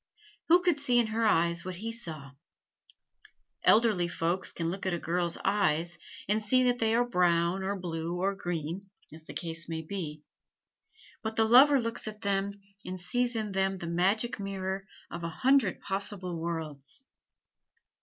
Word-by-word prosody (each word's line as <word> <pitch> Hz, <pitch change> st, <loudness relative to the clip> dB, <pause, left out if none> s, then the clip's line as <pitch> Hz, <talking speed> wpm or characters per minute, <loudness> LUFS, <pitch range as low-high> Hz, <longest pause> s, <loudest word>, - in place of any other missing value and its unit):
Who 350 Hz, +2 st, +6 dB
could 345 Hz, -5 st, +2 dB
see 250 Hz, -4 st, +2 dB
in 240 Hz, -, +4 dB
her 225 Hz, 0 st, +2 dB
eyes 170 Hz, -3 st, +2 dB
what 185 Hz, 0 st, -5 dB
he 220 Hz, +6 st, -4 dB
saw? 155 Hz, -, -6 dB, 1.3 s
Elderly 215 Hz, -6 st, +4 dB
folks 170 Hz, +2 st, -1 dB
can 165 Hz, 0 st, -2 dB
look 190 Hz, +1 st, -4 dB
at 180 Hz, -, +1 dB
a -, -, -2 dB
girl's 170 Hz, 0 st, -1 dB
eyes, 175 Hz, -4 st, +2 dB, 0.3 s
and 210 Hz, +2 st, +2 dB
see 255 Hz, +4 st, +3 dB
that 245 Hz, -1 st, +2 dB
they 225 Hz, 0 st, +2 dB
are 240 Hz, +1 st, +3 dB
brown 175 Hz, -3 st, +2 dB
or 195 Hz, +1 st, -1 dB
blue 170 Hz, -1 st, -3 dB
or 195 Hz, +2 st, +1 dB
green, 175 Hz, +1 st, -4 dB, 0.2 s
as 160 Hz, 0 st, -12 dB
the -, -, -9 dB
case 165 Hz, -1 st, -3 dB
may 160 Hz, -1 st, -3 dB
be; 155 Hz, -4 st, -5 dB, 1.0 s
but 220 Hz, 0 st, -4 dB
the 225 Hz, -, +3 dB
lover 270 Hz, +5 st, +7 dB
looks 230 Hz, -2 st, -1 dB
at 215 Hz, 0 st, -7 dB
them 200 Hz, 0 st, -1 dB, 0.2 s
and 185 Hz, 0 st, -6 dB
sees 245 Hz, +6 st, 0 dB
in 215 Hz, -2 st, -2 dB
them 195 Hz, 0 st, 0 dB
the 175 Hz, -, -6 dB
magic 195 Hz, +8 st, +1 dB
mirror 195 Hz, -1 st, -4 dB, 0.2 s
of 170 Hz, 0 st, -6 dB
a 170 Hz, -, -2 dB
hundred 250 Hz, +4 st, +2 dB
possible 195 Hz, -2 st, -2 dB
worlds. 160 Hz, -, -4 dB
190 Hz, 165 wpm, -30 LUFS, 170-220 Hz, 1.3 s, lover